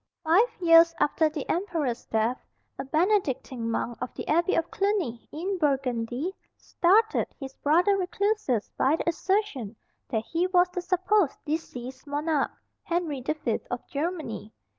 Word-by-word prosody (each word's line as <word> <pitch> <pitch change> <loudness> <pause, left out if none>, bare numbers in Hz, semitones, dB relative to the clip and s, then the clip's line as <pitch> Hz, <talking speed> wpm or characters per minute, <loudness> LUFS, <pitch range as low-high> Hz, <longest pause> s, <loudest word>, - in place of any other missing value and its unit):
Five 370 +10 +4
years 330 -1 +6
after 310 +1 +3
the 300 -2 -5
Emperor's 330 - -2
death, 225 +3 0 0.4
a - - -2
Benedictine 275 - 0
monk 230 +1 -2
of 250 - -3
the - - -6
Abbey 340 +4 +2
of 335 +1 0
Cluny, 390 - -1
in 370 +5 -3
Burgundy, 270 +1 0 0.2
startled 425 +6 +2
his 270 -2 -7
brother 350 +7 +3
recluses 390 - 0
by 280 +4 +4
the - - -5
assertion 335 - -1 0.3
that 220 -4 -1
he 340 +2 0
was 360 -1 +4
the 360 0 -4
supposed 370 -1 +1
deceased 260 -4 -5
monarch, 295 0 0 0.3
Henry 335 -6 -2
the 300 +5 -1
Fifth 235 -7 -2
of 245 - -4
Germany. 295 - -4
320 Hz, 140 wpm, -27 LUFS, 260-360 Hz, 0.4 s, years